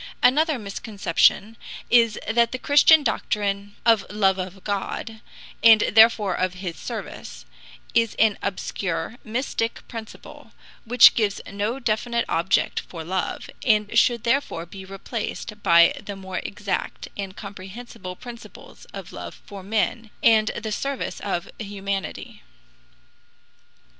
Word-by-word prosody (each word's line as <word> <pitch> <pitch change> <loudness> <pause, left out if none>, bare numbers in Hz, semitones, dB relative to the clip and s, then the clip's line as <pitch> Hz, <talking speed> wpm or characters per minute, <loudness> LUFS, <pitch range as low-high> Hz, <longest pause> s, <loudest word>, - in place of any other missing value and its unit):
Another 300 +4 +4
misconception 205 0 0 0.3
is 230 -3 +5
that 235 +1 +2
the 255 - -3
Christian 290 +3 +6
doctrine 205 -4 -2
of 225 -3 +5
love 195 -2 +2
of 185 +1 -6
God, 215 +2 -4 0.4
and 225 -2 +8
therefore 220 -3 +5
of 185 +1 -1
his 180 -3 -5
service, - - -7 0.5
is 230 -2 +2
an 220 -2 +4
obscure, 190 0 -3
mystic 230 0 -3
principle, 225 -2 -10 0.3
which 245 +1 +8
gives 210 -3 0
no 205 +5 -2
definite 235 0 0
object 170 +4 +1
for 165 -2 -8
love, 185 +2 -3 0.2
and 215 -2 +2
should 235 0 +3
therefore 235 -9 0
be 190 +2 -10
replaced 210 +2 -6
by 170 -2 +6
the 200 - -6
more 190 -2 -5
exact 200 -1 -4
and 195 -1 -6
comprehensible 200 0 -9
principles 240 +3 -12
of - - -10
love - - -8
for 200 -1 -9
men 220 +3 -1
and 220 -2 +5
the 220 -1 -4
service 275 +5 -3
of 190 -4 -3
humanity. 200 -2 -5
210 Hz, 125 wpm, -24 LUFS, 195-230 Hz, 0.5 s, and